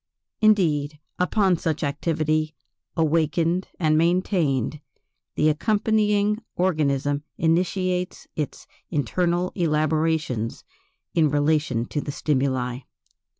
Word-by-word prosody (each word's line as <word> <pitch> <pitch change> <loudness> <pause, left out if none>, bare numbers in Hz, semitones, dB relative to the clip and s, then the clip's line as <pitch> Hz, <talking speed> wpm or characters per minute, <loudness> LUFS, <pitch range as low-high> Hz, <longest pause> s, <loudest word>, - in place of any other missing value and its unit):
Indeed, 160 -9 +3 0.2
upon 185 0 +2
such 160 -1 -2
activity, 155 +1 0 0.4
awakened 165 +2 +1
and 155 -2 +3
maintained, 165 - +1 0.5
the 150 - +3
accompanying 210 +4 +2
organism 145 -5 +1 0.2
initiates 180 +2 0
its 150 -2 -4 0.2
internal 175 +5 0
elaborations 155 - 0 0.5
in 160 -3 +3
relation 145 -4 +1
to 150 - -3
the 145 - -4
stimuli. 130 -4 -1
155 Hz, 85 wpm, -24 LUFS, 145-180 Hz, 0.5 s, Indeed